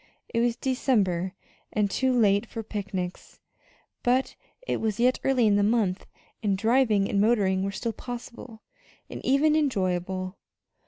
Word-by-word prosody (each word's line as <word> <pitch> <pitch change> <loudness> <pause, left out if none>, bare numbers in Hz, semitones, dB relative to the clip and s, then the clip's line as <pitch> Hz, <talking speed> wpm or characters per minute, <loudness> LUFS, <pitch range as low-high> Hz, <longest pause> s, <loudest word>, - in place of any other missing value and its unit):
It 230 - -1
was 235 0 +2
December, 205 -9 0 0.4
and 210 -1 +1
too 260 +4 +1
late 215 -2 +3
for 225 0 -6
picnics, 195 -4 -5 0.6
but 255 +2 +1 0.3
it - - -2
was 220 -1 -1
yet 250 +2 +3
early 260 -3 +3
in 205 -1 +4
the - - +3
month, 205 -3 +1 0.3
and 200 -3 +1
driving 220 -2 +3
and 200 - +1
motoring 200 -4 +2
were 195 - -1
still 225 +4 -3
possible, 240 -2 -9 0.5
and - - -7
even 300 +3 +3
enjoyable. 185 - -1
220 Hz, 145 wpm, -26 LUFS, 195-245 Hz, 0.6 s, in